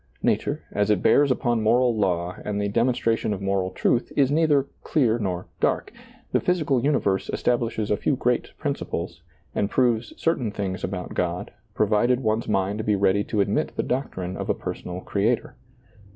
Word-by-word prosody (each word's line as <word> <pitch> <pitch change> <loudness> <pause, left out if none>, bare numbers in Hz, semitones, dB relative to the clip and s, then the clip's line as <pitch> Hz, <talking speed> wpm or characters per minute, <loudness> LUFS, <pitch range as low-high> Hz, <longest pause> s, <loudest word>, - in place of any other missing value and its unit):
Nature, - - 0
as 105 0 0
it 105 -4 +2
bears 145 0 +5
upon 120 -2 +1
moral 120 +2 +3
law 90 -4 0
and 105 -1 -2
the 100 - 0
demonstration 115 0 +1
of 100 - -4
moral 95 -1 0
truth, 120 - 0
is 140 -2 +4
neither 150 -3 +3
" - - -38
clear 120 -7 +2
nor 90 -4 -2
dark." - - 0 0.4
The - - +3
physical 150 -8 +1
universe 135 -10 +1
establishes 115 -3 0
a 105 - +3
few 140 - +1
great 125 -1 0
principles, 85 - -4 0.3
and 100 - 0
proves 120 -3 +1
certain 145 -9 +1
things 100 -2 -4
about 90 -1 -4
God, 90 0 -2 0.2
provided 110 +4 +2
one's 110 +1 0
mind 100 +1 0
be 105 -1 +2
ready 100 +1 +2
to 105 - 0
admit - - 0
the - - 0
doctrine 95 -8 -3
of - - -5
a - - +2
personal 90 +1 -6
Creator. 105 +6 0
110 Hz, 170 wpm, -24 LUFS, 95-125 Hz, 0.4 s, bears